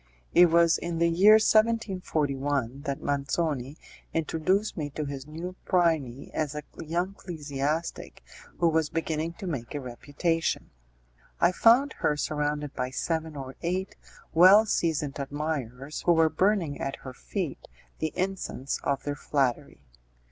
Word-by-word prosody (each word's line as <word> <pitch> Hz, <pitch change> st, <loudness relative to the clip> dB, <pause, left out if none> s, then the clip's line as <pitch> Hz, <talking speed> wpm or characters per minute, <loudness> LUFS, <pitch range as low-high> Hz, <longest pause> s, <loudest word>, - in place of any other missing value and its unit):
It 175 Hz, 0 st, +8 dB
was 170 Hz, 0 st, +4 dB
in 170 Hz, -1 st, -3 dB
the 170 Hz, 0 st, +3 dB
year 195 Hz, +6 st, +7 dB
1741 155 Hz, -, +1 dB
that 140 Hz, -1 st, -2 dB
M. -, -, -12 dB
Manzoni 140 Hz, 0 st, -1 dB, 0.4 s
introduced 165 Hz, +6 st, 0 dB
me 150 Hz, -3 st, -3 dB
to 150 Hz, +2 st, -4 dB
this 140 Hz, -1 st, -6 dB
new 170 Hz, +4 st, -6 dB
Phryne 160 Hz, -8 st, 0 dB
as 150 Hz, -2 st, -2 dB
a 150 Hz, -, -4 dB, 0.2 s
young 175 Hz, +4 st, -1 dB
ecclesiastic 155 Hz, -3 st, -4 dB, 0.3 s
who 170 Hz, -, +3 dB
was 160 Hz, -2 st, +2 dB
beginning 165 Hz, 0 st, -2 dB
to 190 Hz, -, -9 dB
make 140 Hz, -8 st, -4 dB
a -, -, -1 dB
reputation. 145 Hz, +6 st, -2 dB, 0.7 s
I 170 Hz, -, +4 dB
found 240 Hz, +9 st, +5 dB
her 150 Hz, -, +1 dB
surrounded 150 Hz, -1 st, -2 dB
by 125 Hz, -, -2 dB
seven 160 Hz, +3 st, -2 dB
or 135 Hz, -2 st, -7 dB
eight 185 Hz, +2 st, -2 dB, 0.4 s
well 185 Hz, +6 st, +8 dB
seasoned 155 Hz, -8 st, -1 dB
admirers, 140 Hz, -1 st, -4 dB
who 175 Hz, -, +4 dB
were 160 Hz, -1 st, +4 dB
burning 175 Hz, -2 st, +1 dB
at 135 Hz, -, -2 dB
her 130 Hz, -, -6 dB
feet 170 Hz, +2 st, -5 dB, 0.3 s
the 160 Hz, -1 st, -1 dB
incense 185 Hz, -8 st, -3 dB
of 140 Hz, -1 st, -1 dB
their 145 Hz, -, -2 dB
flattery. 140 Hz, -, -1 dB
155 Hz, 140 wpm, -27 LUFS, 140-175 Hz, 0.7 s, It